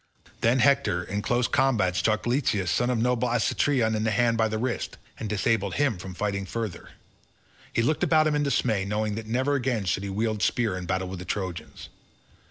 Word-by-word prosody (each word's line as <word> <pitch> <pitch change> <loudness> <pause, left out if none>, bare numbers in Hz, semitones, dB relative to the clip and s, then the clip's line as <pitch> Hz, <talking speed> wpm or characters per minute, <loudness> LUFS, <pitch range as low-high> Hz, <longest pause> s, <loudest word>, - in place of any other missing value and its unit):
Then 115 +3 +3
Hector 140 -10 +3
in 100 +4 -3
close 120 +3 +1
combat 110 -9 +2
struck 110 +2 +1
Leitus 120 - +1
son 120 +1 +1
of 125 - +1
noble 125 +1 +1
Alectryon 120 +1 +1
in 110 - -1
the 110 - +1
hand 115 +2 +2
by 110 -1 +2
the 110 0 -2
wrist, 120 +2 -3 0.2
and 110 - -4
disabled 105 -2 0
him 135 -9 +1
from 95 0 -8
fighting 100 0 -2
further. 110 -5 -5 0.8
He 115 - +1
looked 150 +5 +1
about 155 -2 +4
him 155 - +2
in 150 - +1
dismay, 120 -8 +1
knowing 105 +2 -1
that 110 +1 -6
never 130 +5 0
again 125 -6 0
should 90 +2 0
he 100 - -4
wield 110 +1 -1
spear 115 -5 +1
in 90 -1 -6
battle 95 0 -1
with 95 0 -6
the 90 - -7
Trojans. 85 -8 -5
110 Hz, 200 wpm, -26 LUFS, 100-125 Hz, 0.8 s, about